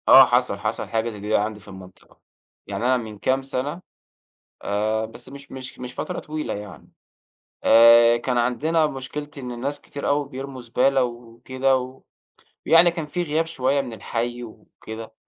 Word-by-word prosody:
آه، -, -, +10 dB
حصل -, -, +1 dB
حصل -, -, -3 dB
حاجة 115 Hz, 0 st, 0 dB
زي 105 Hz, -2 st, -9 dB
دي 105 Hz, +2 st, -1 dB
عندي 105 Hz, +1 st, 0 dB
في 105 Hz, -, -18 dB
المنطقة. 95 Hz, -1 st, -14 dB, 0.5 s
يعني 100 Hz, +3 st, -3 dB
أنا 130 Hz, 0 st, +4 dB
من 110 Hz, -3 st, -7 dB
كام 130 Hz, +6 st, +1 dB
سنة، 135 Hz, +5 st, -4 dB, 0.8 s
آآ، 110 Hz, +2 st, 0 dB
بس 120 Hz, +3 st, -12 dB
مش 140 Hz, +1 st, -12 dB
مش 130 Hz, 0 st, -8 dB
مش 125 Hz, 0 st, -7 dB
فترة -, -, -4 dB
طويلة 155 Hz, 0 st, -4 dB
يعني. 105 Hz, -2 st, -9 dB, 0.8 s
آآ، 115 Hz, +1 st, +7 dB
كان 125 Hz, +1 st, -1 dB
عندنا 155 Hz, +7 st, +2 dB
مشكلة 145 Hz, +1 st, -6 dB
إن 125 Hz, -2 st, -6 dB
الناس 140 Hz, +4 st, -4 dB
كتير 140 Hz, -, -6 dB
أوي 145 Hz, -1 st, +1 dB
بيرموا 135 Hz, 0 st, -7 dB
زبالة 125 Hz, +3 st, +2 dB
وكده، 120 Hz, +3 st, -1 dB
و 130 Hz, +1 st, -8 dB, 0.6 s
يعني 170 Hz, +1 st, +6 dB
كان 165 Hz, -2 st, -4 dB
في 175 Hz, +4 st, -2 dB
غياب 160 Hz, 0 st, 0 dB
شوية 140 Hz, -3 st, 0 dB
من 125 Hz, -4 st, -7 dB
الحي 120 Hz, +3 st, -3 dB
وكده. 110 Hz, 0 st, -10 dB
125 Hz, 165 wpm, -23 LUFS, 115-140 Hz, 0.8 s, آه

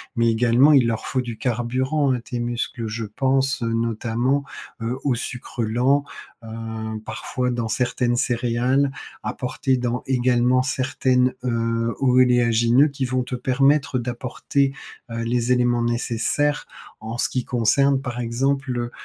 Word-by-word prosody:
mais 115 Hz, -1 st, +3 dB
également 120 Hz, +5 st, +4 dB
il 135 Hz, -4 st, +5 dB
leur 115 Hz, -1 st, -2 dB
faut 130 Hz, +1 st, 0 dB
du 120 Hz, -2 st, -6 dB
carburant, 130 Hz, +4 st, 0 dB
à 125 Hz, -, -2 dB
tes 120 Hz, +1 st, -5 dB
muscles, 120 Hz, 0 st, -3 dB
je 110 Hz, +1 st, -4 dB
pense, 135 Hz, +4 st, 0 dB
heu, 115 Hz, 0 st, -1 dB
notamment, 115 Hz, +4 st, 0 dB, 0.4 s
heu, 120 Hz, +3 st, -2 dB
aux 135 Hz, -4 st, +1 dB
sucres 125 Hz, 0 st, -4 dB
lents. 125 Hz, +6 st, +2 dB, 0.4 s
Heu 115 Hz, -, -9 dB, 0.6 s
parfois 125 Hz, +3 st, -3 dB
dans 120 Hz, -2 st, -2 dB
certaines 120 Hz, 0 st, 0 dB
céréales, 125 Hz, +3 st, +1 dB, 0.3 s
apportés 130 Hz, 0 st, -1 dB
dans 125 Hz, 0 st, -2 dB
également 125 Hz, -1 st, +3 dB
certaines, 130 Hz, -1 st, +1 dB
heu, 115 Hz, -1 st, 0 dB
oléagineux 125 Hz, 0 st, +4 dB
qui 140 Hz, -1 st, -3 dB
vont 130 Hz, 0 st, 0 dB
te 125 Hz, +1 st, -5 dB
permettre 135 Hz, +1 st, +2 dB
d'apporter, 125 Hz, +3 st, -1 dB, 0.4 s
heu, 115 Hz, 0 st, -4 dB
les 120 Hz, +1 st, +1 dB
éléments 120 Hz, -1 st, +2 dB
nécessaires 120 Hz, +5 st, 0 dB, 0.3 s
en 110 Hz, +2 st, -6 dB
ce -, -, +1 dB
qui 125 Hz, -2 st, -2 dB
concerne 135 Hz, +4 st, +2 dB
par 125 Hz, -2 st, -5 dB
exemple, 135 Hz, +3 st, -1 dB
heu 120 Hz, 0 st, -3 dB
125 Hz, 140 wpm, -22 LUFS, 120-130 Hz, 0.6 s, il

